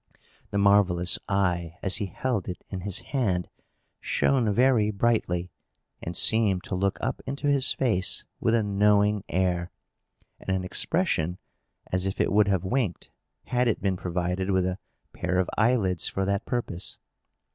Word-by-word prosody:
The 100 - -2
marvellous 100 -3 +3
eye, 90 -4 0
as 95 +1 +1
he 105 -2 -2
held 105 0 -2
it 90 - -6
in 95 -2 -4
his 100 0 -2 0.2
hand, 95 - 0 0.5
shone 125 -6 +1
very 120 -1 +3
brightly, 100 -5 0 0.5
and 85 - -4
seemed 105 -5 +2
to - - -6
look 95 +1 0
up 130 +3 -2
into 140 +2 -4
his 140 -2 +3
face 105 -8 +1
with 115 - +2
a 115 - +2
knowing 105 0 +3
air, 90 -1 0 0.7
and - - -10
an 95 - -2
expression 90 - 0 0.5
as 95 +1 0
if 95 - -4
it - - +2
would 105 0 +4
have 95 -3 +1
winked, 100 -2 -2 0.3
had 125 0 0
it 115 - +1
been 95 -1 0
provided 90 +1 -2
with 95 -2 +2
a 90 +1 -2 0.3
pair 90 0 -2
of 95 -1 +2
eyelids 105 -6 +2
for 95 - -2
that 100 +2 -1
purpose. 120 -8 -3
100 Hz, 155 wpm, -26 LUFS, 90-110 Hz, 0.7 s, would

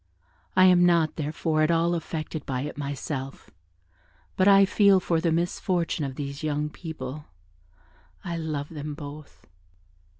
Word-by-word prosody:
I 185 0 +7
am 180 -1 +6
not, 170 -3 +3
therefore, 155 +1 -1
at 155 - +3
all 170 +1 +2
affected 160 -2 -4
by 130 -2 -2
it 150 +2 -5
myself, 140 -1 -5 0.8
but 185 - +3
I 195 0 +7
feel 200 0 +4
for 165 -3 0
the 170 -1 +1
misfortune 170 0 -1
of 135 -2 -4
these 140 0 -5
young 150 -1 -1
people 150 -4 -7 1.0
I 170 -2 -4
love 155 -3 -3
them 150 -2 -6
both." 145 0 -10
155 Hz, 140 wpm, -26 LUFS, 145-170 Hz, 1.0 s, I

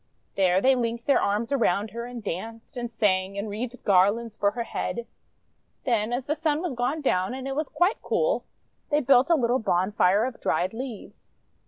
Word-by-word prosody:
There 185 -1 +3
they 265 +3 +5
linked 235 -1 -2
their 280 - +4
arms 210 +5 0
around 215 -6 +1
her 235 +1 -5
and 245 -2 -8
danced, 225 - -6
and 240 -1 -4
sang, 195 -3 +1
and 200 +2 -3
wreathed 235 +4 -5
garlands 205 +4 +3
for 200 - +2
her 235 +3 -4
head. 235 +1 -4 0.8
Then 230 -3 +1
as 245 +1 -2
the 295 - 0
Sun 310 -1 0
was 345 -4 -3
gone 250 +6 -1
down 190 -4 0
and 265 0 -6
it 270 - -3
was 305 0 -2
quite 360 +5 +1
cool, - - 0 0.5
they 295 - +3
built 260 +2 +4
a 335 - +6
little 250 -2 +1
bonfire 195 +1 +2
of 255 -2 -6
dried 185 +3 0
leaves. 240 -2 -8
235 Hz, 190 wpm, -26 LUFS, 205-265 Hz, 0.8 s, a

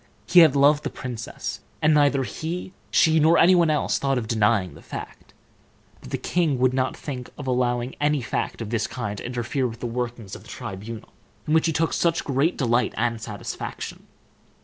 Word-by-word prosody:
He 180 - +6
had 155 -5 +7
loved 145 +2 +4
the 145 - -2
princess, 120 -4 -6 0.2
and 155 0 +4
neither 145 -2 +3
he, 170 +7 -5 0.2
she, 160 0 +4
nor 160 +2 +5
any 180 +3 +6
one 170 -3 +4
else, 150 -1 +1
thought 135 -1 +1
of 115 -3 -3
denying 105 -4 +2
the - - -14
fact; - - -9 0.7
but - - -12
the - - -2
king 165 -6 0
would 125 0 +2
not 130 0 0
think 125 -4 -6
of 145 - -7
allowing 125 -1 0
any 150 0 +2
fact 120 -1 -3
of 110 - -7
this 115 -3 0
kind 105 -5 -4
to - - -7
interfere 125 +2 -1
with 115 -1 -8
the - - -5
workings 120 -3 -4
of - - -10
the - - -16
tribunal, 105 +3 -7 0.4
in 155 - +1
which 160 +1 +4
he - - +2
took 160 +1 0
such 170 0 +1
great 140 +5 +1
delight 120 -2 +1
and 115 -1 0
satisfaction. 105 -3 -6
130 Hz, 195 wpm, -24 LUFS, 115-150 Hz, 0.7 s, had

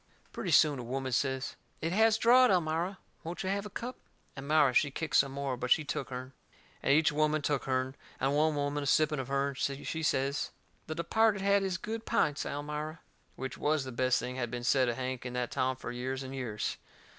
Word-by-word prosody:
Pretty - - -4
soon 150 -4 +5
a - - -5
woman 130 +2 -3
says: 130 +1 -1 0.2
"It 165 - -2
has 220 +3 +4
drawed, 250 +3 +6
Elmira; 175 +1 +1 0.3
won't 170 +3 -5
you 190 - -1
have 200 +1 -2
a - - -11
cup?" 240 +5 -6 0.4
Elmira 140 -1 +3
she 145 - +4
kicked 150 +1 -3
some 135 0 +4
more, 140 -1 -2
but 125 0 -4
she 155 - +5
took 145 - -3
hern. 130 +1 -6 0.5
And - - +2
each 155 +2 +5
woman 155 0 +1
took 145 -2 0
hern. 130 0 0 0.3
And 135 +1 +1
one 155 +1 +3
woman, 145 0 -1
a 140 - -3
sipping 155 0 +3
of 130 - -4
hern, 140 0 0
she 140 +4 -3
says: 140 -2 0 0.4
"The 155 - -4
departed 205 +4 +2
had 200 0 +4
his 190 -2 -1
good 225 +5 -5
pints, 150 -1 +1
Elmira." 150 +2 -4 0.3
Which 130 -1 -6
was 150 -1 +1
the 130 - -6
best 130 +1 +2
thing 125 +1 -4
had 120 -2 -2
been 120 0 -5
said 130 0 +3
of 120 - -1
Hank 130 0 -4
in 125 -1 -5
that 125 -1 -2
town 130 0 0
fur 125 - -6
years 130 +2 -3
and 130 0 -7
years. 120 -6 -3
140 Hz, 215 wpm, -31 LUFS, 130-160 Hz, 0.5 s, drawed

